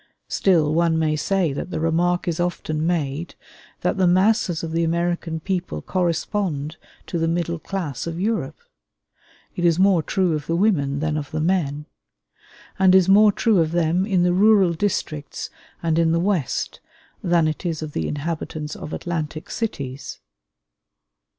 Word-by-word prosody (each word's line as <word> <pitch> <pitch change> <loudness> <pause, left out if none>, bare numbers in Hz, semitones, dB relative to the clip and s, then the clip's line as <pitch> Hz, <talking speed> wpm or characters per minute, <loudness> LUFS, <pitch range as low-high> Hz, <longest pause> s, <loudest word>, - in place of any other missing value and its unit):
Still 160 -6 +2
one 165 0 +2
may 155 -1 +1
say 170 0 0
that 140 - -5
the - - -3
remark 170 +2 +1
so 170 +1 -1
often 155 -2 -3
made, 160 -1 -2 0.5
that - - 0
the 185 -1 +3
masses 185 -1 +2
of 165 - -4
the 165 +1 +1
American 170 0 -1
people 180 +1 -3
correspond 170 -3 -1 0.3
to 170 - -3
the 165 - +1
middle 170 0 -1
class 165 -4 -4
of 165 0 -4
Europe, 195 -9 -1 1.0
is 170 -2 +2
more 190 -2 +4
true 180 +1 0
of 150 -2 -3
the 165 - 0
women 150 -8 +1
than 155 -1 0
of 145 -2 -5
the 155 - -3
men; 155 -4 0 0.9
and 190 -1 +6
is 190 -1 +5
more 205 +2 +6
true 210 -1 +2
of 160 0 +1
them, 175 +3 +1
in 185 -4 +2
the 175 0 +3
rural 195 -2 +5
districts 155 -5 -3 0.3
and 165 -1 +1
in 165 -1 +3
the 170 - +2
West 180 - -1 0.4
than 170 -2 +3
it 155 - -3
is 165 -3 -2
of 155 - -6
the 80 - -2
inhabitants 155 0 -4
of 150 - -8
Atlantic 160 -2 -4
cities. 140 - -4
170 Hz, 160 wpm, -22 LUFS, 155-185 Hz, 1.0 s, and